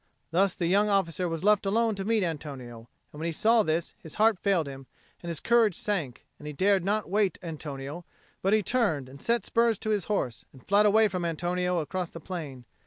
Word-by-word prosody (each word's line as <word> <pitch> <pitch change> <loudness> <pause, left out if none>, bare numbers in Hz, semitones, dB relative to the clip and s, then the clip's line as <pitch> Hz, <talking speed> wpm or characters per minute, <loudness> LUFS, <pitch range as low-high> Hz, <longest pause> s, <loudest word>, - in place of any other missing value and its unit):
Thus 185 +2 +2
the 175 - -2
young 200 +5 +3
officer 180 -3 0
was 165 +1 -4
left 210 0 +4
alone 220 +3 +1
to 195 -1 -4
meet 220 0 +1
Antonio; 135 -8 -6 0.2
and 150 - -10
when 165 - -2
he - - -1
saw 225 +7 +3
this 165 -3 -1
his 160 - -11
heart 215 -3 +3
failed 190 -6 +1
him 135 -1 -9 0.3
and 175 - -9
his 165 -3 -3
courage 230 -5 +3
sank, 170 - -3
and 150 - -9
he 150 - -5
dared 190 +4 +2
not 210 +3 0
await 200 -2 +1
Antonio, 150 -1 -6 0.4
but 195 - +1
he 215 0 +3
turned 175 - 0
and 135 +2 -12
set 235 0 0
spurs 230 -2 +2
to 215 - -3
his 205 -3 0
horse, 130 - -2
and 130 - -17
fled 205 +2 +5
away 220 +1 +5
from 180 -3 -3
Antonio 175 +2 -1
across 175 +2 -3
the 165 - -9
plain. 150 -8 -7
180 Hz, 215 wpm, -28 LUFS, 155-210 Hz, 0.4 s, fled